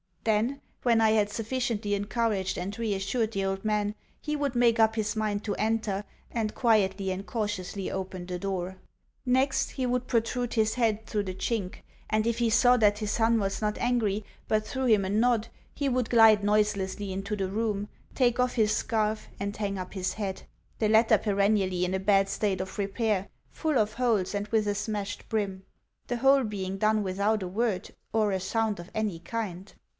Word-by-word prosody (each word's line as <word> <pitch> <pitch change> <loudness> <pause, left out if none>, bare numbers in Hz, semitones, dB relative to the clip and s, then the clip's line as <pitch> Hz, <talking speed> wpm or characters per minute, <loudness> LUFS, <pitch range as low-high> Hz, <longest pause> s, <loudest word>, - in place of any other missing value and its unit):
Then, 230 +6 +1 0.2
when 235 -2 +4
I 220 -1 +5
had 210 -2 +3
sufficiently 225 -2 -2
encouraged 205 -2 -1
and 195 +3 -4
reassured 220 +1 -1
the 195 -2 -1
old 195 0 -2
man, 210 -1 +1 0.3
he 300 0 -3
would 285 -3 -1
make 235 -1 +4
up 220 0 +4
his 215 -1 -1
mind 210 -1 -1
to 205 - -2
enter, 215 -2 0 0.3
and 220 -2 -2
quietly 195 -5 +2
and 190 +1 -4
cautiously 205 -3 -3
open 185 -1 -5
the 180 0 -4
door. 190 -1 -3 0.5
Next, 265 +2 +2
he 260 - -2
would 250 0 -1
protrude 240 +1 0
his 220 -1 +2
head 220 -3 +1
through 210 -1 -1
the 185 -2 -5
chink, 195 -2 -2 0.3
and 215 0 +1
if 235 0 0
he 235 -1 +2
saw 245 +2 +5
that 210 -3 +4
his 210 -2 -2
son 230 0 +3
was 195 -1 -2
not 210 -1 0
angry, 220 -4 0 0.2
but 215 0 +1
threw 265 +2 -2
him 215 -5 +4
a - - -2
nod, 225 +2 +2 0.3
he 280 -1 -1
would 250 -2 0
glide 220 -3 +6
noiselessly 205 -1 0
into 195 +3 -3
the 195 -2 -1
room, 210 0 -1 0.3
take 245 -2 +2
off 250 0 +2
his 215 -2 +2
scarf, 215 -2 -1
and 200 +1 -3
hang 200 -2 -2
up 185 -1 -6
his 190 -2 -2
hat 195 -3 -4 0.4
(the 215 - +2
latter 220 +1 +5
perennially 200 -3 +1
in 180 - -2
a 190 - 0
bad 195 0 +3
state 200 -2 0
of 190 0 -7
repair, 200 -1 0 0.2
full 310 -4 -1
of 215 -1 +1
holes, 225 -7 +1
and 205 0 -2
with 215 -1 +1
a 205 - 0
smashed 205 -1 -4
brim) 195 -3 -2 0.4
the 245 - -1
whole 270 +2 +5
being 195 -3 -3
done 215 +1 +2
without 200 +2 0
a - - -3
word 205 +1 -1 0.2
or 215 -2 +2
a 190 - 0
sound 215 +2 -1
of 175 +2 -9
any 215 -6 -1
kind. 190 0 -5
210 Hz, 190 wpm, -28 LUFS, 195-230 Hz, 0.5 s, glide